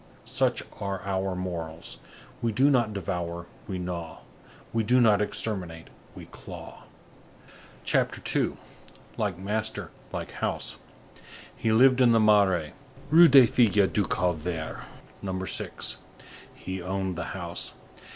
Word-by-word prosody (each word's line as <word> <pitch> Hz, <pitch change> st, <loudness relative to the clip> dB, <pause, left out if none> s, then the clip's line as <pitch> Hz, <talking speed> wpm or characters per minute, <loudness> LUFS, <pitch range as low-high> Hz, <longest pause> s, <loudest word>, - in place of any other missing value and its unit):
Such -, -, 0 dB, 0.2 s
are 100 Hz, -1 st, -3 dB
our 95 Hz, -1 st, -1 dB
morals. 85 Hz, -3 st, -5 dB, 0.4 s
We 115 Hz, -, +1 dB
do 135 Hz, +7 st, +4 dB
not 120 Hz, -5 st, +3 dB
devour, 85 Hz, -3 st, -4 dB, 0.2 s
we 95 Hz, -, -3 dB
gnaw; 85 Hz, -3 st, -5 dB, 0.5 s
we 115 Hz, -, +2 dB
do 125 Hz, +4 st, +4 dB
not 110 Hz, -4 st, +5 dB
exterminate, 90 Hz, -6 st, -3 dB, 0.3 s
we -, -, -9 dB
claw." -, -, -11 dB, 1.0 s
CHAPTER -, -, +1 dB, 0.2 s
II—LIKE 100 Hz, -5 st, -5 dB
MASTER, 105 Hz, +3 st, -3 dB, 0.2 s
LIKE -, -, -5 dB
HOUSE -, -, -3 dB, 0.8 s
He 115 Hz, -, 0 dB
lived 130 Hz, +3 st, +5 dB
in 120 Hz, -2 st, +6 dB
the 115 Hz, -, +5 dB
Marais, 100 Hz, -7 st, +4 dB, 0.4 s
Rue 170 Hz, +2 st, +9 dB
des 135 Hz, -3 st, +8 dB
Filles 105 Hz, -4 st, +3 dB
du 105 Hz, -, +2 dB
Calvaire, 85 Hz, -2 st, -2 dB, 0.4 s
No. 95 Hz, -1 st, -3 dB
6. -, -, -2 dB, 0.5 s
He 95 Hz, 0 st, -6 dB
owned 95 Hz, 0 st, -2 dB
the 85 Hz, 0 st, -4 dB
house. 85 Hz, -1 st, -4 dB
95 Hz, 120 wpm, -27 LUFS, 90-110 Hz, 1.0 s, Rue